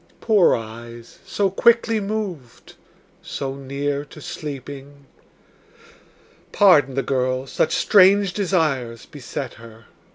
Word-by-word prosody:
Poor 210 -6 +4
eyes, 115 +1 -10
so 195 0 0
quickly 230 +2 +3
moved, 195 - -6 0.5
so 135 -1 -5
near 140 +1 -3
to 150 - -14
sleeping? 140 -1 -8 1.5
Pardon 150 -10 +4
the 135 - 0
girl; 130 -1 -1
such 145 - 0
strange 195 -1 +4
desires 155 - -1
beset 140 -5 -7
her. 115 -1 -14
140 Hz, 100 wpm, -21 LUFS, 130-195 Hz, 1.5 s, Poor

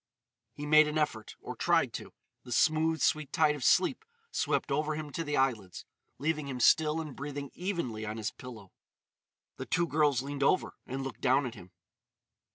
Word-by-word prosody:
He 145 - -7
made 155 +1 +6
an 150 +1 -2
effort—or 115 -8 -3
tried - - +2
to: - - -7 0.3
the 125 - -12
smooth, 160 +5 +2
sweet 155 -3 +1
tide 155 -2 +3
of 145 -3 -6
sleep 190 - +3 0.3
swept - - -1
over 150 +2 0
him 150 -1 -6
to 165 - -3
the 150 -1 -2
eyelids, 115 -9 -1 0.3
leaving 150 0 -1
him 130 -2 -5
still 155 +5 +4
and 155 -4 -6
breathing 140 -1 -6
evenly 170 - -3
on 110 +1 -4
his 110 0 -3
pillow. 110 -7 -11 0.9
The - - -6
two 175 -1 +1
girls 145 -5 +2
leaned 140 0 -5
over 140 +6 +2
and 135 +1 -4
looked 135 - -7
down 135 +1 +3
at 120 - -5
him. 90 -6 -13
145 Hz, 175 wpm, -30 LUFS, 125-155 Hz, 0.9 s, made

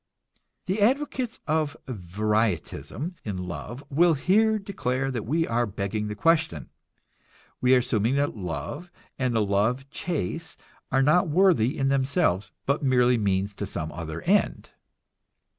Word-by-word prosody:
The 190 +3 -1
advocates 255 +1 +1
of 155 -1 0
varietism 110 - -2
in 100 -4 -4
love 90 +9 -6
will 165 +3 +4
here 215 +9 +3
declare 135 -10 -2
that 120 -4 -4
we 165 +5 +1
are 120 -2 0
begging 100 +2 -3
the 105 - -4
question. 155 - +1 0.9
We 125 +1 +5
are 125 -1 +2
assuming 115 +4 +1
that 145 -2 0
love 95 - -5 0.3
and 130 -3 0
the 110 -2 +2
love 110 +7 +1
chase 160 - -3 0.3
are 135 +1 +3
not 175 +6 +4
worthy 150 - +3
in 135 0 +1
themselves, 135 - +1 0.2
but 140 +2 +1
merely 125 -3 +3
means 100 0 0
to 100 0 -5
some 80 -5 -4
other 80 0 -6
end. 205 +3 +1
125 Hz, 140 wpm, -26 LUFS, 105-160 Hz, 0.9 s, We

